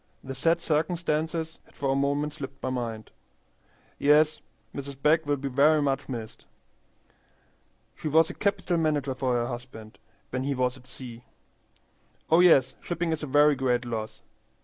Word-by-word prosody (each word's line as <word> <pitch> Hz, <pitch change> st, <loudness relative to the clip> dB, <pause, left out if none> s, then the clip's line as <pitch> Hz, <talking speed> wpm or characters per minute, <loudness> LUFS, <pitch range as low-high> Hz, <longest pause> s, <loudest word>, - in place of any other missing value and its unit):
The 135 Hz, -, -6 dB
sad 165 Hz, +6 st, +2 dB
circumstances 160 Hz, 0 st, -1 dB
had -, -, -24 dB
for 135 Hz, -1 st, -1 dB
a -, -, +1 dB
moment 145 Hz, +2 st, 0 dB
slipped 135 Hz, -2 st, -8 dB
my 130 Hz, -, -1 dB
mind. 115 Hz, -4 st, -4 dB, 0.9 s
Yes, 150 Hz, +2 st, +4 dB, 0.3 s
Mrs. 140 Hz, -1 st, -7 dB
Begg 155 Hz, +2 st, +3 dB
will 145 Hz, -, +2 dB
be 140 Hz, +1 st, -4 dB
very 145 Hz, +4 st, +4 dB
much 140 Hz, -1 st, -1 dB
missed. 115 Hz, -4 st, -7 dB, 1.5 s
She -, -, -5 dB
was 160 Hz, +2 st, +5 dB
a -, -, -9 dB
capital 195 Hz, -3 st, 0 dB
manager 150 Hz, -4 st, 0 dB
for 130 Hz, -1 st, 0 dB
her 120 Hz, -1 st, +1 dB
husband 120 Hz, -3 st, -8 dB, 0.3 s
when 130 Hz, 0 st, -2 dB
he 140 Hz, 0 st, -1 dB
was 125 Hz, 0 st, 0 dB
at 130 Hz, -1 st, -17 dB
sea. 120 Hz, -2 st, -9 dB, 1.1 s
Oh 165 Hz, -, +6 dB
yes, 140 Hz, -8 st, +6 dB
shipping 175 Hz, -1 st, -2 dB
is 160 Hz, -, -2 dB
a 150 Hz, -, -4 dB
very 145 Hz, +2 st, +5 dB
great 125 Hz, -2 st, 0 dB
loss." 110 Hz, -2 st, -5 dB
140 Hz, 160 wpm, -27 LUFS, 130-155 Hz, 1.5 s, Oh